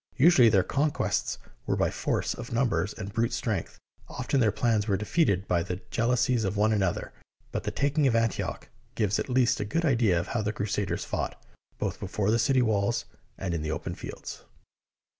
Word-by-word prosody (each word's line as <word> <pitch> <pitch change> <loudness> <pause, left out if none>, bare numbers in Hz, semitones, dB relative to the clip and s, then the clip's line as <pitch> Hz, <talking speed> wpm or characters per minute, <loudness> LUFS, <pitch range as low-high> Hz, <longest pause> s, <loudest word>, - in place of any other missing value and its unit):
Usually 135 -5 +7
their 100 -4 +4
con 145 +9 +1
quests - - -1 0.3
were - - +1
by - - +1
force - - -1
of 120 0 -8
numbers 115 -6 +1
and 100 -2 -7
brute 115 +1 +1
strength. - - -2 0.3
Often 130 +2 -1
their 110 -4 +4
plans 110 -1 +1
were 100 -3 +2
defeated 100 - +1
by 85 -1 +2
their 90 +1 -4
jealousies 120 0 +2
of 100 0 -1
one 110 +2 +3
another, 95 -4 -1 0.4
but - - -3
the - - 0
taking 145 +1 +1
of 120 - +2
Antioch 115 -1 -1 0.3
gives 105 -3 +1
at - - -3
least 125 -1 +3
a - - 0
good 165 +12 -1
idea 115 - +3
of 85 - -5
how 120 - 0
the 105 0 -1
Crusaders 100 -4 -2
fought, - - -3 0.4
both - - -3
before 105 0 -1
the 115 - +3
city 130 +2 +3
walls 110 0 +1 0.3
and 90 -3 -3
in 85 - -1
the 80 - -3
open 75 - -3
fields. - - -8
110 Hz, 195 wpm, -28 LUFS, 100-125 Hz, 0.4 s, Usually